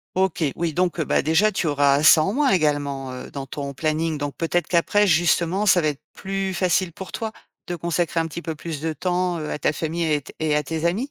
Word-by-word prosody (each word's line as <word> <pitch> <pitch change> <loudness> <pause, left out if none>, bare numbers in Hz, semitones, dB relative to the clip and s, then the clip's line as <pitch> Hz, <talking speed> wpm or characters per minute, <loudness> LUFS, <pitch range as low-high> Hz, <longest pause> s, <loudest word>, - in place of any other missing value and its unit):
OK. 185 -3 +1
Oui, 165 -3 -2
donc, 180 -1 0
heu, - - +1
bah, - - +1
déjà 160 +8 +3
tu 190 - -1
auras 145 -1 +3
ça 155 +1 +7
en 195 +6 -1
moins 280 0 +2
également, 145 - 0
heu, 125 - -8
dans 135 -1 -6
ton 140 0 -5
planning. 155 +2 -1
Donc, 145 -1 -4
peut-être 170 +1 0
qu'après, 205 +4 +3
justement, 175 +2 +2
ça 190 -3 +5
va 155 - +1
être 145 -2 -4
plus 195 0 -3
facile 185 -1 +1
pour 190 +3 -9
toi, 220 -1 -4 0.3
de 175 - -3
consacrer 170 0 -1
un 165 - 0
petit 170 +2 -7
peu 165 -2 -4
plus 155 -1 -6
de 160 0 -1
temps 180 +2 -1
heu, 155 - -4
à - - -3
ta 150 - +1
famille 165 +2 -2
et 155 -2 +2
à - - -3
t 135 - -14
et 155 -1 +1
à 150 - +2
tes 160 +3 -4
amis? 215 +12 0
165 Hz, 250 wpm, -23 LUFS, 150-180 Hz, 0.3 s, ça